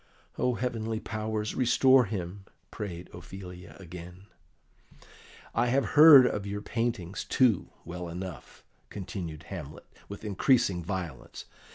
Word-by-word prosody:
"O 125 -1 +1
heavenly 115 -2 -2
powers, 110 -1 -3
restore 130 +1 +5
him!" 95 -1 -5 0.3
prayed 90 -5 -6
Ophelia 90 0 -10
again. 90 +1 -10 1.3
"I 120 +2 +2
have 130 +3 +1
heard 150 -4 +10
of 105 -4 -1
your 105 +1 -4
paintings, 110 -6 -2
too, 120 -8 +2 0.2
well 90 0 -6
enough," 90 -2 -8 0.3
continued 85 -5 -6
Hamlet, 80 -7 -8 0.2
with 100 +2 -8
increasing 100 -3 +2
violence. 85 -8 -6
100 Hz, 110 wpm, -29 LUFS, 90-115 Hz, 1.3 s, heard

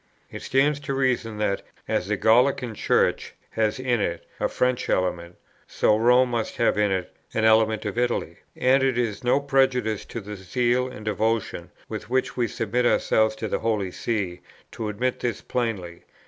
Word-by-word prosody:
It - - -7
stands 140 +2 +2
to 140 -1 -4
reason 125 -5 0
that, 100 -2 0 0.3
as - - -1
the - - 0
Gallican 125 +1 +3
Church - - +1 0.2
has 110 +3 0
in 125 -3 0
it 85 -3 -2
a - - 0
French 125 0 0
element, 90 -2 -1 0.3
so 105 - +2
Rome 125 +3 +4
must 115 -2 -2
have 115 - +2
in 105 -1 +2
it 95 -2 -3 0.2
an 110 - +2
element 110 0 +3
of 105 +3 -2
Italy; 120 -1 -1 0.2
and 130 +1 +3
it 135 -2 +1
is 115 -3 -1
no 125 +3 +3
prejudice 130 -6 +1
to - - -6
the 105 0 -7
zeal 120 +6 0
and 125 -4 -10
devotion 110 +1 -1 0.2
with - - -7
which 130 +1 0
we 120 -2 +1
submit 115 +3 -1
ourselves 110 -2 +2
to - - -4
the - - -1
Holy 105 -5 -1
See 95 -5 -2 0.3
to 110 -2 -4
admit 125 +5 -1
this 120 -4 -2
plainly. 105 -9 -3
115 Hz, 175 wpm, -24 LUFS, 105-125 Hz, 0.3 s, Rome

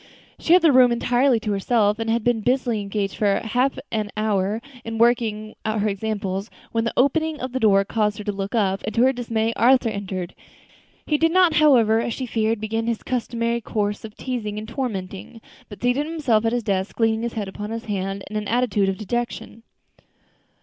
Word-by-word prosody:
She 330 - +3
had 360 - +6
the 320 - +6
room 255 -2 +6
entirely 245 +1 +2
to 210 - -2
herself, 210 +1 +1
and 225 0 -2
had 230 0 +1
been 240 -1 +1
busily 245 -2 0
engaged 200 -1 -2
for 200 -2 +2
half 250 +4 0
an 215 -2 -1
hour 210 -1 0 0.2
in 225 0 -5
working 225 -2 +1
out 215 -1 -1
her 210 - +1
examples, 200 -1 -3 0.2
when 225 0 0
the 230 - -1
opening 310 +4 +1
of 255 0 -4
the 260 - -2
door 200 -4 +4
caused 210 -1 0
her 210 - -6
to 205 - -2
look 195 +2 -4
up, 195 -3 +1
and, 215 - -5
to 235 - +4
her 265 +1 +4
dismay, 230 -2 -1
Arthur 245 +1 +4
entered. 190 -4 -5 0.7
He 300 -1 0
did 325 0 +3
not, 365 -2 +4
however, 240 -8 +5
as 230 0 -2
she 260 - -4
feared, 225 -1 0
begin 225 +1 -2
his 235 -2 -2
customary 235 -1 -1
course 205 -2 -2
of 215 -1 -9
teasing 225 -5 -4
and 215 +1 -6
tormenting, 220 -4 -5 0.3
but 205 - -10
seated 255 +5 +1
himself 275 -9 +1
at 225 - +2
his 245 -1 -1
desk, 195 0 -2
leaning 225 -1 +2
his 235 0 -3
head 210 -3 -3
upon 205 +2 -6
his 225 +1 -5
hand 195 -1 -3
in 215 - -8
an 210 -1 -3
attitude 220 -5 +1
of 190 - -2
dejection. 235 +2 -4
225 Hz, 205 wpm, -23 LUFS, 205-245 Hz, 0.7 s, had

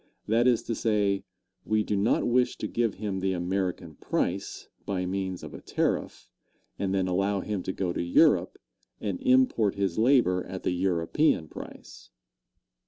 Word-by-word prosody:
That 115 +3 +3
is 120 -3 +3
to 115 - -3
say, 105 -3 0 0.4
we 110 0 +1
do 105 - -1
not 100 +4 +2
wish 125 +1 +2
to - - -3
give 115 -2 0
him 100 -2 -3
the 95 0 0
American 90 -2 -2
price, 95 +2 -2 0.2
by 95 -2 -2
means 95 -1 -3
of - - -8
a - - -9
tariff, - - -2 0.5
and 95 -1 -1
then 95 -1 +1
allow 95 +2 0
him 105 -2 -3
to 95 - -3
go 95 -2 -2
to - - -2
Europe 85 0 +3 0.4
and 100 -4 -3
import 125 -5 +3
his 100 -1 -1
labor 115 -7 +3
at 95 - -7
the - - 0
European 90 - +1
price. - - -11
100 Hz, 165 wpm, -27 LUFS, 90-110 Hz, 0.5 s, That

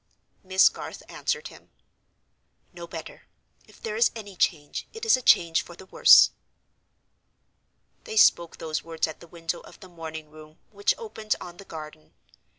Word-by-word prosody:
Miss 190 0 +5
Garth - - -5
answered 475 -1 -3
him: - - -17 1.0
"No - - -9
better; - - -9 0.4
if - - -19
there 455 0 -5
is 470 +1 +4
any 205 -4 -9
change, 150 -4 -1
it 450 0 -7
is 450 - +6
a 255 - -5
change 170 -8 +4
for 175 - -12
the 190 - -13
worse." - - +7 1.7
They 445 -2 -6
spoke 170 - +4
those 155 -1 -4
words 165 -1 -1
at 155 - -8
the 170 - -14
window 165 0 -5
of - - -16
the 190 - -12
morning 160 -3 -8
room 155 0 -15
which 200 -1 +1
opened 220 - -3
on 175 -1 -10
the 195 - -12
garden. 155 -2 -10
Mr. - - -33
175 Hz, 165 wpm, -26 LUFS, 160-220 Hz, 1.7 s, worse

